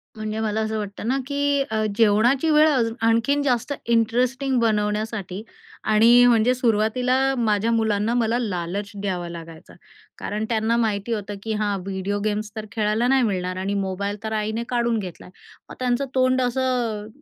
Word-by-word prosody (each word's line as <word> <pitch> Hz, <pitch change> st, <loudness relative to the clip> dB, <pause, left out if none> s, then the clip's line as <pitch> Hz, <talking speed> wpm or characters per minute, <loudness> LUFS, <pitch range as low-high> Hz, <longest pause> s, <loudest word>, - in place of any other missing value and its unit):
म्हणजे 215 Hz, 0 st, -4 dB
मला 220 Hz, 0 st, -1 dB
असं 220 Hz, 0 st, -2 dB
वाटतं 205 Hz, +1 st, -5 dB
ना, 260 Hz, +3 st, +1 dB
की 285 Hz, 0 st, +1 dB, 0.3 s
जेवणाची 235 Hz, +7 st, +3 dB
वेळ 305 Hz, +1 st, +6 dB
अज 240 Hz, -6 st, +1 dB
आणखीन 230 Hz, +5 st, +2 dB
जास्त 250 Hz, -1 st, 0 dB, 0.2 s
इंटरेस्टिंग 250 Hz, +4 st, +1 dB
बनवण्यासाठी 210 Hz, -3 st, -1 dB, 0.4 s
आणि 230 Hz, +3 st, +6 dB
म्हणजे 235 Hz, +1 st, +4 dB
सुरुवातीला 245 Hz, +1 st, +1 dB, 0.2 s
माझ्या 220 Hz, -1 st, +1 dB
मुलांना 220 Hz, -1 st, +1 dB
मला 235 Hz, 0 st, +1 dB
लालच 200 Hz, -2 st, -3 dB
द्यावा 180 Hz, -3 st, -3 dB
लागायचा. 165 Hz, -1 st, -10 dB, 0.4 s
कारण 215 Hz, +1 st, -3 dB
त्यांना 225 Hz, +1 st, +1 dB
माहिती 220 Hz, -1 st, -1 dB
होतं 205 Hz, -1 st, -4 dB
की 220 Hz, -, -2 dB
हां 205 Hz, -2 st, 0 dB
व्हिडिओ 195 Hz, +1 st, -3 dB
गेम्स 210 Hz, 0 st, -2 dB
तर 220 Hz, -1 st, -5 dB
खेळायला 215 Hz, +2 st, 0 dB
नाही 265 Hz, 0 st, +3 dB
मिळणार 185 Hz, -4 st, -2 dB
आणि 190 Hz, +2 st, -2 dB
मोबाईल 200 Hz, +1 st, -2 dB
तर 220 Hz, 0 st, -3 dB
आईने 220 Hz, +2 st, -2 dB
काढून 235 Hz, -2 st, +1 dB
घेतला 180 Hz, -4 st, -8 dB
आहे. 180 Hz, -, -15 dB, 0.4 s
मग -, -, -9 dB
त्यांचं 250 Hz, +2 st, 0 dB
तोंड 255 Hz, 0 st, +3 dB
असं, 245 Hz, -4 st, -1 dB
220 Hz, 155 wpm, -23 LUFS, 205-245 Hz, 0.4 s, वेळ